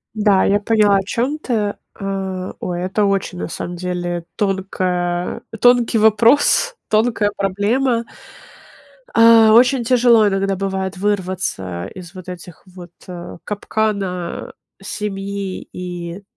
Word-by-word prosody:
Да, 205 -3 +3
я 205 +1 +3
поняла, 210 -1 +3
о 195 - -1
чём 245 +9 -1
ты. 215 -8 -1 0.2
А, 190 -2 -4
ой, 175 -1 -3
это 190 +3 0
очень, 195 -2 -1
на - - -3
самом 175 +1 -5
деле, 175 -1 -3
тонкая 185 -3 -1 0.2
тонкий 245 -1 +4
вопрос, 230 - +4
тонкая 215 -1 +2
проблема. 230 +5 0 1.1
А, 230 -1 +7
очень 245 +2 +5
тяжело 235 -2 +4
иногда 195 0 0
бывает 190 0 -3
вырваться 185 - -2
из 175 -1 -10
вот 185 -1 -10
этих 175 -1 -10
вот, 180 -2 -12 0.2
э, 175 -1 -8
капкана 200 -4 -3 0.3
семьи 195 -1 -5
и 175 +1 -6
195 Hz, 115 wpm, -19 LUFS, 180-220 Hz, 1.1 s, А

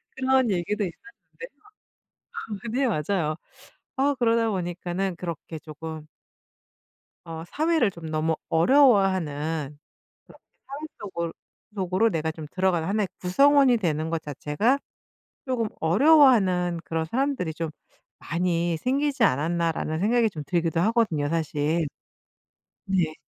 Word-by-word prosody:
그런 260 -2 +2
얘기도 205 +4 -1
있었는데요. 410 - -12 1.1
네 265 0 +1
맞아요. 155 -3 -1 0.6
어 280 +2 +2
그러다 230 -2 +2
보니까는 180 0 -3
그렇게 170 -2 -6
조금 155 0 -8 1.2
어 165 -1 -7
사회를 310 - +1
좀 165 -2 -9
너무 155 +1 0
어려워하는 165 - +2 0.5
그렇게 - - -19 0.2
사회 275 +1 -7 0.2
속으 170 -5 -4 0.4
속으로 190 +3 +1
내가 160 -2 -1
좀 155 -1 -8
들어가는 185 -3 0
'1 210 +2 0
의 - - -5
구성원이 270 +6 +4
되는 160 -4 -1
것 165 -1 -1
자체가 150 - 0 0.7
조금 245 -4 -1
어려워하는 190 - +4
그런 160 +1 -2
사람들이 235 - -1
좀 165 -2 -3 0.5
많이 170 -1 -1
생기지 275 - 0
않았나.'라는 160 +2 0
생각이 225 +2 +2
좀 155 -6 -7
들기도 165 -1 0
하거든요, 200 -10 +1
사실. 155 0 0 1.0
네. 175 -5 0
180 Hz, 270 characters per minute, -25 LUFS, 160-230 Hz, 1.2 s, 구성원이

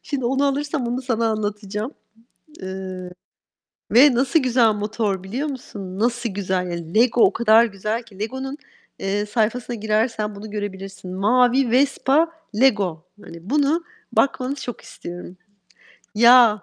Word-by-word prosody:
Şimdi 275 -4 -4
onu 270 +3 +1
alırsam 280 -2 -1
onu 245 +2 -2
sana 230 -3 0
anlatacağım, 210 +2 -3 0.7
eee, 185 -1 -6 0.8
ve 260 +3 +7
nasıl 265 +5 +3
güzel 245 -3 +3
motor 210 -2 -2
biliyor 245 +11 -3
musun? 200 -9 -7
Nasıl 235 +1 0
güzel. 180 -3 -2
Lego 235 +1 +4
o - - +5
kadar 230 0 +5
güzel 215 +2 -3
ki. 205 -4 -17
Lego'nun, 265 +5 -4 0.4
eee, 205 +2 -1
sayfasına 235 +3 -1
girersen 215 0 -1
bunu 210 +2 -9
görebilirsin. 195 -2 -6
Mavi, 245 +5 +3
Vespa, 280 +5 +2 0.3
Lego. 195 -11 +2 0.2
Hani, 170 +3 -11
bunu 300 +4 +2 0.3
bakmanı 265 0 +1
çok 250 -4 -7
istiyorum. 175 +1 -9 0.8
Ya! 235 -2 +6
225 Hz, 125 wpm, -22 LUFS, 200-255 Hz, 0.8 s, ve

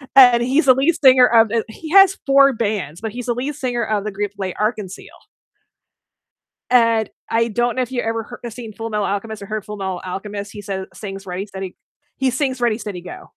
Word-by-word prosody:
And 245 -3 +8
he's 270 +5 +2
the 255 - +9
lead 285 +6 +2
singer 255 -1 +8
of, 225 -2 +4
uh 230 - +1
he 310 +8 -10
has 390 -1 +6
4 275 0 +5
bands, 205 -7 -3
but 220 -2 -4
he's 245 +1 -6
the 240 - 0
lead 265 +5 -3
singer 245 -2 -2
of 210 -1 -1
the 215 - -3
group 205 0 -3
L'Arc-en-Ciel. 200 +1 -3 1.6
And 230 -3 +3 0.2
I 230 +1 +1
don't 240 +3 0
know 255 - +1
if 250 - -5
you 250 -2 -1
ever 225 +2 -4
h 235 - -5
seen 230 -2 -8
Fullmetal 215 -2 -3
Alchemist 210 +1 -4
or - - -7
heard 215 0 -5
Fullmetal 195 -4 -4
Alchemist. 200 +2 -6
He 205 - -9
says 190 -1 -4
sings 195 -1 -8
Ready 185 +3 -4
Steady 190 -2 -7 0.4
he 265 -1 +1
sings 260 -1 -2
"Ready 230 -2 +1
Steady 205 -5 -6
Go!" 180 - -10
225 Hz, 200 wpm, -20 LUFS, 200-250 Hz, 1.6 s, the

